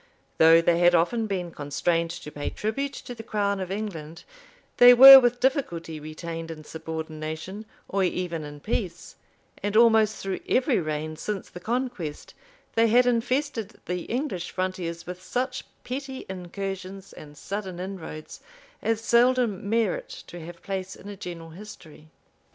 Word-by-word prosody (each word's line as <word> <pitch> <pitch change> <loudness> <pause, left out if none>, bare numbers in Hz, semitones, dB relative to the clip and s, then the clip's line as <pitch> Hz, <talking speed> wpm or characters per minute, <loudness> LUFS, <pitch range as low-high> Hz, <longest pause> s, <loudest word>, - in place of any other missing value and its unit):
Though 165 +1 +7
they 170 0 +3
had 175 0 +5
often 220 +7 +1
been 180 -4 -3
constrained 165 +3 -1
to 150 - -8
pay 145 -1 -4
tribute 275 +7 -3
to 245 - -8
the 230 - -9
crown 200 -2 -1
of 185 -1 -4
England, 175 -6 -5 0.5
they 245 0 +9
were 270 +2 +12
with 245 -1 +1
difficulty 175 - -1
retained 165 +2 -7
in 155 -1 -8
subordination 160 +5 -6 0.2
or 195 0 0
even 175 -3 -2
in 145 0 -9
peace; 185 -4 -4 0.5
and 205 +1 0
almost 220 -2 +5
through 195 -1 -4
every 255 -2 +2
reign 155 -1 -3
since 205 +1 -5
the 180 - -9
conquest, 230 - -4 0.4
they 230 0 +4
had 245 +3 +5
infested 245 -2 -1
the 180 -1 -3
English 235 - -3
frontiers 185 -3 -3
with 180 +1 -7
such 255 +6 -3 0.2
petty 265 +1 -6
incursions 190 +1 -6
and 150 -1 -12
sudden 195 -3 -5
inroads, 180 -5 -7 0.4
as 225 0 0
seldom 235 -4 +2
merit 230 - 0 0.2
to 175 - -10
have 170 +1 -11
place 190 -1 -4
in 200 - -11
a 205 - -7
general 170 -3 -8
history. 160 -5 -12
190 Hz, 150 wpm, -26 LUFS, 165-230 Hz, 0.5 s, were